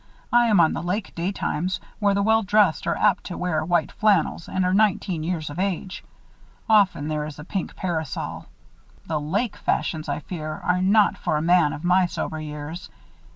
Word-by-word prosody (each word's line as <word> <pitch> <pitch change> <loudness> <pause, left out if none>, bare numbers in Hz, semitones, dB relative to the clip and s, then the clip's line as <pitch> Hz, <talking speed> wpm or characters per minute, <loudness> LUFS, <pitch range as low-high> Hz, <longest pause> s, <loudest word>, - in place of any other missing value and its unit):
"I 240 0 +5
am 210 -5 +4
on 160 -2 +4
the - - -3
lake 185 +4 -3
daytimes, 180 0 -2 0.2
where 200 -2 +2
the 200 - +1
well 220 +1 +4
dressed 205 -4 +2
are - - +1
apt 200 -2 +2
to 180 - -6
wear 175 -3 -1
white 170 -1 +1
flannels 195 -5 +1
and 185 -1 0
are 180 - +1
nineteen 195 -4 +1
years 160 -2 -3
of 150 - -7
age. 190 0 -3 0.6
Often 200 -9 +3
there 155 -1 -2
is 155 - -9
a 150 - -8
pink 190 0 -4
parasol. 160 -6 -4 0.6
The 155 -2 -2
lake 200 +10 -1
fashions, 155 -2 -1
I 145 - -2
fear, 155 -1 -5
are 180 0 +1
not 205 +2 +3
for 150 - 0
a - - -1
man 170 -3 +4
of 150 - -7
my 180 +1 +3
sober 160 -2 -4
years. 155 +5 -7
180 Hz, 190 wpm, -24 LUFS, 155-200 Hz, 0.6 s, I